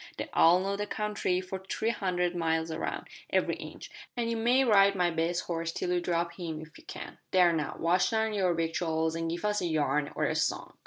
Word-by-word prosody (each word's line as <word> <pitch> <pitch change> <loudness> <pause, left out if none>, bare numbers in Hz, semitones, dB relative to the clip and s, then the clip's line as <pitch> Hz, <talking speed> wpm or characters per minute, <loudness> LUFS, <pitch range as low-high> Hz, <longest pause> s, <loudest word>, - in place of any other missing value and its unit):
They - - -4
all 170 +2 +6
know 195 +1 -1
the 205 +1 -3
country 205 -4 -1
for 190 +1 -6
three 220 +4 -1
hundred 180 -5 -1
miles 160 -1 0
around 160 +1 -4 0.2
every - - +1
inch - - -9 0.3
an' 235 -1 0
you 230 - 0
may 240 +4 +3
ride 200 -4 +5
my 180 -2 +2
best 170 +2 0
horse 165 -1 -2
till 175 - -2
you 175 0 +1
drop 170 -1 -1
him 160 -3 -4
if 155 0 -11
ye - - -17
can. - - -9
There, 180 -2 +5
now, 155 -2 -2
wash 175 +2 +2
down 220 -1 0
your 185 -4 +1
victuals 160 -1 0
an' 165 0 -2
give 170 +4 -3
us 210 0 +1
a 175 - 0
yarn, 150 -2 0
or - - -1
a - - 0
song." - - -1
175 Hz, 220 wpm, -29 LUFS, 165-200 Hz, 0.3 s, all